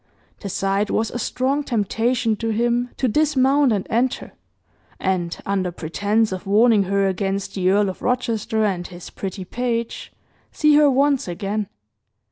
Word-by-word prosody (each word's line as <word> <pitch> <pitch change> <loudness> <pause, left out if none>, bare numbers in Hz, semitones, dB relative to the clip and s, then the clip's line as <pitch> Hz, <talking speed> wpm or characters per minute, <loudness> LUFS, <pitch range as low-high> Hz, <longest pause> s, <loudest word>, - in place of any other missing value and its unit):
The 200 - -6
sight 195 +2 0
was 225 0 0
a 240 - -4
strong 265 +5 -1
temptation 230 0 0
to 225 +1 -2
him 240 +2 0
to 260 - +1
dismount 280 0 +3
and 200 -3 0
enter, 245 +3 -1 0.7
and, 175 -3 -1
under 190 -2 -1
pretence 205 +7 0
of 185 +1 -6
warning 210 0 +4
her 195 +1 +1
against 195 +1 -2
the 185 -1 +1
Earl 200 +1 +3
of 190 - -5
Rochester 230 -3 0
and 180 -4 -2
his 175 -1 -11
"pretty 190 -1 -6
page," 235 +2 -3 0.4
see 300 -1 +3
her 295 0 +6
once 275 -1 +2
again. 200 +4 -3
215 Hz, 150 wpm, -21 LUFS, 195-245 Hz, 0.7 s, her